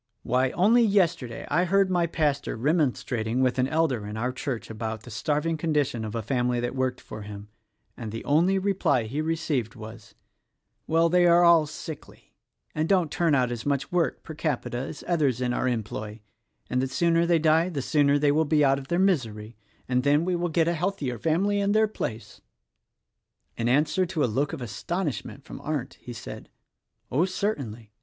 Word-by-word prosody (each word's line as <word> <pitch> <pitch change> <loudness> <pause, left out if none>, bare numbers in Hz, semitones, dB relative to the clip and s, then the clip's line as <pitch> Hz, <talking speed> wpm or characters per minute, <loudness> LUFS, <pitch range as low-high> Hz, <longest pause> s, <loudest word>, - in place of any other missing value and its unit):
why, 130 +1 +2
only 220 +7 +4
yesterday 175 - +1
I 165 +5 +3
heard 195 +1 +2
my 175 -2 +2
pastor 150 -6 -1
remonstrating 125 -4 0
with 130 0 +1
an 130 - +3
elder 135 -9 0
in 105 +1 -6
our 125 +3 -1
church 125 -3 -5
about 110 -1 -5
the 120 - -11
starving 150 +8 -1
condition 150 -7 0
of 110 +1 -5
a 115 - -2
family 125 +1 0
that 120 +1 -2
worked 130 -1 -1
for 110 - -9
him; 105 0 -9 0.5
and 115 -3 -6
the 115 - -6
only 170 +7 +3
reply 190 - +1
he 130 +8 -3
received 155 -8 -1
was: 110 0 -11 0.7
'Well, 165 +1 +3
they 175 +1 +4
are 170 +1 +6
all 170 -3 +6
sickly 155 0 -10 0.4
and 155 +1 -1
don't 180 -6 +2
turn 165 -4 +2
out 125 -2 +1
as 120 -2 -4
much 140 -2 -1
work 175 -2 0
per 160 - -8
capita 145 -5 -2
as 140 +3 -6
others 145 -8 +1
in 125 -1 0
our 130 - 0
employ, 110 -2 -4 0.3
— - - -45
and 125 - 0
the 135 - 0
sooner 170 +5 +2
they 170 -1 +4
die 160 +2 +3
the 155 -6 -3
sooner 145 -1 +3
they 145 0 +3
will 155 +2 +3
be 150 -1 +3
out 135 0 +3
of 135 - -10
their 170 - 0
misery; 120 - 0 0.3
and 125 0 +1
then 145 +4 +3
we 180 -1 0
will 175 0 -1
get 165 +1 +2
a 170 - +2
healthier 155 - -2
family 190 - +1
in 200 0 +1
their 220 0 +4
place!'" 115 - -6 1.1
In 115 +1 -1
answer 150 +7 +2
to 165 -4 -1
a - - +4
look 135 +5 0
of 150 -6 -5
astonishment 145 - -4
from - - -10
Arndt 145 -3 -4
he 125 - -8
said, 80 - -9 0.6
"Oh, 150 +8 +3
certainly! 135 - -3
145 Hz, 195 wpm, -26 LUFS, 120-170 Hz, 1.1 s, are